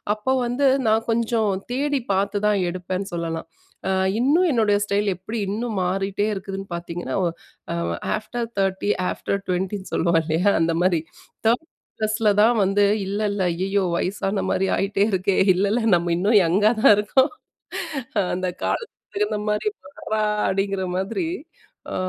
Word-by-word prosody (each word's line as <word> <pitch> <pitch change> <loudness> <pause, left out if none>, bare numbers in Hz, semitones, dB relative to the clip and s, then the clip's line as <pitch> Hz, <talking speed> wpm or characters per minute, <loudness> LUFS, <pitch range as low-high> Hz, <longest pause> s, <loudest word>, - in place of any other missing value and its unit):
அப்போ 215 +5 -2
வந்து 250 +4 +1 0.2
நான் 220 +1 +2
கொஞ்சம் 225 -1 +1 0.2
தேடி 285 +2 0
பார்த்து 200 +2 0
தான் 210 -1 +2
எடுப்பேன்னு 185 +2 -4
சொல்லலாம். 165 -1 -3 0.4
அ - - +2 0.3
இன்னும் 305 +9 +3
என்னுடைய 215 -5 +3
ஸ்டைல் 205 0 0
எப்படி 190 +6 -6
இன்னும் 220 +1 -2
மாறிட்டே 195 +2 -1
இருக்குதுன்னு 195 0 -6
பார்த்தீங்கன்னா, 170 0 -5
ஓ - - +2 0.5
அ - - -2 0.4
ஆஃப்டர் 235 +2 -4
30, 195 +1 0 0.2
ஆஃப்டர் 200 - -2
20ன்னு 190 +2 -2
சொல்லுவோம் 170 0 +3
இல்லையா? 165 +5 +2
அந்த 165 0 +2
மாரி. 180 -2 +3 0.5
30 245 +8 +2 0.3
ப்ளஸ்ல 215 0 +1
தான் 235 +1 +4
வந்து, 195 +2 +2 0.2
"இல்ல 200 +2 -3
இல்ல 200 -1 -2
ஐயயோ! 195 +3 0
வயசான 195 +1 -1
மாரி 195 - +1
ஆயிட்டே 200 +1 +1
இருக்கே! 190 0 +1 0.2
இல்லைல்ல 200 +5 +1
நம்ம 170 0 0
இன்னும் 205 +5 +4
யங்கா 200 +6 +3
தான் - - +8
இருக்கோம். 260 +7 +2 1.0
அந்த 185 0 -2 0.2
காலத்துக்கு 460 - -4
தகுந்த 415 - 0
மாரி 210 - 0 0.3
வறா" 215 0 -2 0.3
அப்படிங்கிற 195 0 -1
மாதிரி, 205 - -2 0.7
அ - - -3
200 Hz, 145 wpm, -23 LUFS, 185-220 Hz, 1.0 s, தான்